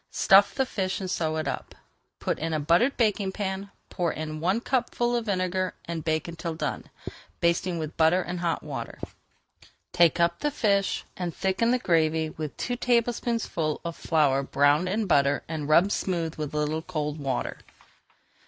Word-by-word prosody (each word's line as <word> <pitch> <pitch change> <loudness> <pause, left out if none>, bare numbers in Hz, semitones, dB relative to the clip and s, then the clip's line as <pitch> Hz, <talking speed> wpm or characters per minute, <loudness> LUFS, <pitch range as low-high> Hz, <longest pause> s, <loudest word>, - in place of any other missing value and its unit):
Stuff 195 0 +5
the 265 - +2
fish 190 -6 -2
and 185 -2 -4
sew 160 -3 -1
it 155 - -2
up. - - -5 0.4
Put - - -2
in 165 +1 -2
a - - 0
buttered 170 - +3
baking 210 -4 +1
pan, 195 0 -3 0.2
pour 175 -3 0
in 155 0 -5
one 185 +7 +1
cupful 240 -1 0
of 235 -1 -2
vinegar, 185 -1 -1
and 165 -2 -4
bake 160 0 0
until 165 -1 -5
done, - - -4 0.5
basting 170 +1 +1
with 155 -1 -5
butter 165 +3 +4
and 175 0 -4
hot 170 -1 -1
water. 135 -6 -6 1.0
Take 170 -1 +4
up 170 0 +2
the 295 - 0
fish 200 -8 +1
and 175 -3 -4
thicken 190 +4 +1
the 250 - +3
gravy 160 -6 +1
with 155 -2 -6
two 245 0 -2
tablespoonfuls 235 - 0
of 170 -1 -3
flour 145 -4 +2
browned 145 +5 +2
in 215 +3 0
butter 140 -5 +3
and 155 -2 -4
rubbed 175 +6 +5
smooth 170 -6 -1
with 150 -2 -5
a - - 0
little 150 +1 0
cold 155 -3 -3
water. 135 -3 -2
170 Hz, 170 wpm, -27 LUFS, 155-195 Hz, 1.0 s, Stuff